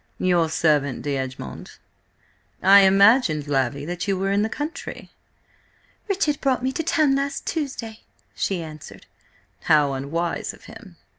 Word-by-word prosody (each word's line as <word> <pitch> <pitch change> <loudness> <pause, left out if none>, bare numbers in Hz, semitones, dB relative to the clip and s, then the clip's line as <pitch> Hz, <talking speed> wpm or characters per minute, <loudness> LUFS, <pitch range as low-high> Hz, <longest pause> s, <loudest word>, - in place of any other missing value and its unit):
"Your 175 -3 +2
servant, 150 -5 +1
D'Egmont. 130 - -5 0.9
I 195 +2 +8
imagined, 195 - +4
Lavvy, 140 0 -1
that 175 +3 -4
you 195 -1 0
were 195 +1 -1
in 200 +1 +2
the 220 - 0
country?" 300 +8 -6 1.0
"Richard 340 -7 0
brought 260 -3 0
me 260 - 0
to 295 - -3
town 310 -3 +2
last 275 0 -3
Tuesday," 260 -8 -4 0.3
she 185 -4 -2
answered. 155 -2 -11 0.6
"How 150 -3 +3
unwise 160 +6 -3
of - - -21
him!" 210 -6 -13
190 Hz, 135 wpm, -23 LUFS, -, 1.0 s, I